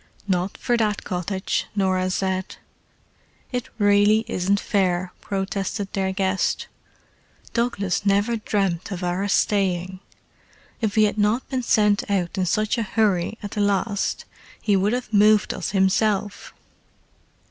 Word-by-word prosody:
"Not 185 0 -1
for 240 - 0
that 210 -2 0
cottage," 190 +1 -2
Norah 185 -2 +1
said. 190 0 -2 1.0
"It 245 -2 -3
really 205 +1 +4
isn't 200 -2 +1
fair," 185 -3 0
protested 195 +1 -3
their 190 -1 0
guest. 190 0 0 0.9
"Douglas 205 -6 0
never 205 +3 +2
dreamed 195 -4 -1
of 185 -1 -4
our 180 +3 -1
staying: 190 -3 0 0.8
if 215 -3 -1
he 215 - +5
had 210 0 +1
not 210 +5 +1
been 260 -2 -1
sent 210 -3 +2
out 185 -3 0
in 185 - +1
such 215 +6 +1
a 215 -4 -3
hurry 205 -2 +2
at 205 - -5
the 210 - -2
last 200 0 0 0.3
he 205 -2 +1
would 200 +3 +2
have 245 -3 -4
moved 210 +1 +4
us - - -4
himself." 200 +1 +1
200 Hz, 135 wpm, -23 LUFS, 190-215 Hz, 1.0 s, he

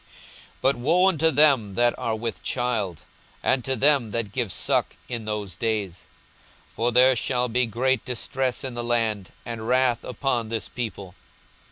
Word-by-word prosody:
42:021:023 - - -30 0.5
But 135 +1 +4
woe 165 +9 +3
unto 160 -3 +2
them 140 -10 +3
that 120 0 +2
are 115 - -1
with 115 +1 -4
child, 115 -9 -2 0.4
and 130 -2 +2
to 135 +2 -1
them 135 -2 +3
that 105 -1 -2
give 120 -4 -2
suck, - - 0
in 115 -3 -5
those 105 -4 -4
days! 105 -5 -2 0.7
for 115 +5 0
there 125 +2 +6
shall 125 +1 0
be 125 +1 +1
great 125 +2 0
distress 125 +1 -2
in 130 -2 -4
the 120 0 -4
land, 115 -5 0
and 115 -1 -5
wrath 125 -1 +2
upon 120 -2 -2
this 115 -1 -3
people. 100 -6 -6
120 Hz, 165 wpm, -25 LUFS, 110-130 Hz, 0.7 s, there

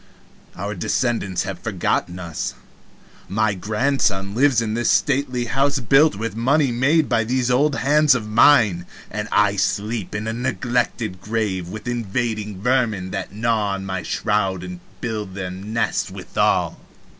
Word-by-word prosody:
Our 105 +1 -4
descendants 100 0 -1
have - - -5
forgotten 90 +1 -1
us. 85 -4 -4 0.7
My 110 +1 +1
grandson 105 -1 0
lives 130 +1 +3
in 110 -1 -1
a 120 - -1
stately 130 -1 +1
house 135 +4 +1
built 135 +4 +4
with 110 0 -4
money 135 +4 +2
made 140 +6 +2
by 115 -2 +2
these 125 +2 0
old 140 +3 +3
hands 150 +1 +4
of 110 -4 -3
mine, 105 -6 +4 0.2
and - - -3
I - - +3
sleep 105 -1 -1
in 105 +1 -3
a 110 - -1
neglected 120 -5 -2
grave 105 -5 -2
with 110 +5 -8
invading 110 -3 -2
vermin 115 -7 +1
that 95 - -4
gnaw 105 -2 0
my 95 -1 -4
shroud 100 -4 -1
to 90 -1 -7 0.2
build 105 -5 -4
them 95 +2 -6
nests 115 +1 0
withal! - - 0
110 Hz, 145 wpm, -21 LUFS, 100-125 Hz, 0.7 s, built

